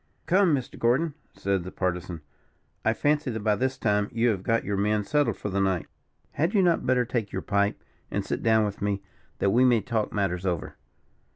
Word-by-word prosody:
"Come, 180 -2 +4
Mr. 130 -3 -6
Gordon," 135 +7 +2 0.2
said 100 -2 -1
the 95 - -7
Partisan, 90 -2 -3 0.6
"I 110 - +3
fancy 145 +4 +1
that 110 -2 -3
by 105 -1 +3
this 130 +3 -1
time 105 -3 +1
you 115 +1 +2
have 100 -5 -1
got 115 +3 +1
your 100 - -2
men 105 +1 +1
settled 145 +6 +1
for 105 - -4
the 100 0 0
night. 95 -3 +1 0.5
Had 165 +8 0
you 195 - +5
not 170 -7 +2
better 125 -1 +3
take 115 -4 -2
your 95 - -4
pipe, 100 0 +1 0.3
and - - -2
sit - - -3
down 110 -1 +3
with 105 -1 -5
me, 100 -1 -1 0.3
that 100 - +2
we 120 +5 +4
may 125 -3 +5
talk 110 +1 -2
matters 95 -3 -1
over. 90 -5 -2
110 Hz, 205 wpm, -26 LUFS, 100-125 Hz, 0.6 s, you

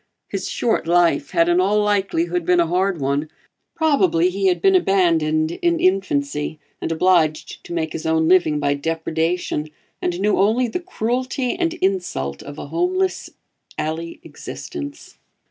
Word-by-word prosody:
His - - -3
short 225 -8 0
life 170 -5 +3
had 170 - +2
in 175 +1 +3
all 205 +3 +2
likelihood 180 -4 0
been 180 +1 +3
a 170 - +4
hard 180 +1 0
one; 140 +3 -1 0.5
probably 185 - +2
he 195 +1 0
had 180 - +2
been 385 -1 +4
abandoned 165 - +2
in 340 -1 +2
infancy 150 -6 0 0.2
and - - -2
obliged 165 -2 +1
to - - -10
make 160 -2 -2
his 160 - -4
own 160 0 +2
living 170 -4 +3
by 145 -1 +1
depredation, 160 +1 -2 0.3
and 175 0 -2
knew 205 +1 +1
only 225 +6 +3
the 235 - -3
cruelty 255 -5 -2
and 340 -2 -1
insult 175 - -2
of 145 +1 -9
a - - -7
homeless 370 +2 -1 0.5
alley 165 +2 -4
existence. 295 -5 -8
180 Hz, 150 wpm, -21 LUFS, 160-210 Hz, 0.5 s, a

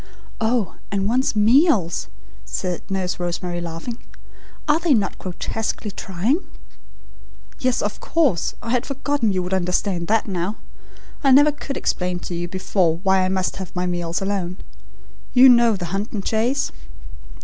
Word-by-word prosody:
'" - - -20
"Oh, 230 -8 -1
and 200 -1 0
one's 250 +2 +1
meals," 215 - +3 0.4
said 180 - -3
Nurse 185 -2 -2
Rosemary 175 0 -3
laughing. 170 +8 -6 0.7
"Are 300 +1 +4
they 330 -5 +3
not 210 - -1
grotesquely 210 +3 -3
trying?" 200 - -1 1.2
"Yes, 255 -1 +1
of 205 0 -3
course; 285 - +1
I 230 - -3
had 250 0 +2
forgotten 275 -4 0
you 185 -1 0
would 180 +1 -3
understand 180 -1 0
all 225 - +5
that 225 - -7
now. 185 +1 -2 0.7
I 275 - +4
never 290 +3 +7
could 280 -1 -6
explain 180 0 -1
to - - -6
you 175 0 -3
before 180 -2 +1
why 190 -1 +4
I 185 - +1
must 185 -1 -1
have 190 -1 -7
my 180 0 0
meals 175 0 -2
alone. 190 -2 -2 0.8
You 260 +1 +9
know 235 -2 +5
the 180 -2 -4
hunt 200 +3 -2
and 200 -3 -4
chase?" 240 +6 +1
195 Hz, 160 wpm, -22 LUFS, 180-245 Hz, 1.2 s, You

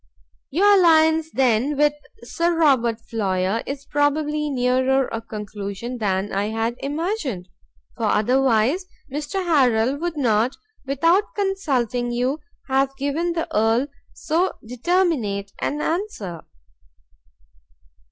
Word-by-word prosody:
"Your 400 +6 +5
alliance 320 -2 +4
then 260 +2 +1
with 295 0 +4 0.3
Sir 340 0 0
Robert 245 -8 +3
Floyer 195 -1 -1
is 275 0 -5
probably 295 +1 0
nearer 260 0 +2
a 225 - -3
conclusion 210 +2 -6
than 195 -1 -1
I 200 +1 0
had 225 +2 -1
imagined, 285 - -3 0.5
for 230 - -2
otherwise 255 - +2 0.3
Mr 300 +6 -3
Harrel 260 -5 +3
would 335 0 -3
not, 235 -1 +2 0.3
without 330 +9 +2
consulting 265 - -1
you, 250 +5 -1 0.3
have 270 0 +1
given 310 +5 -1
the 330 -1 -2
Earl 225 +4 +3 0.3
so 340 +5 0
determinate 245 - 0
an 295 +1 -2
answer." 310 - -3
270 Hz, 110 wpm, -22 LUFS, 225-315 Hz, 0.5 s, Your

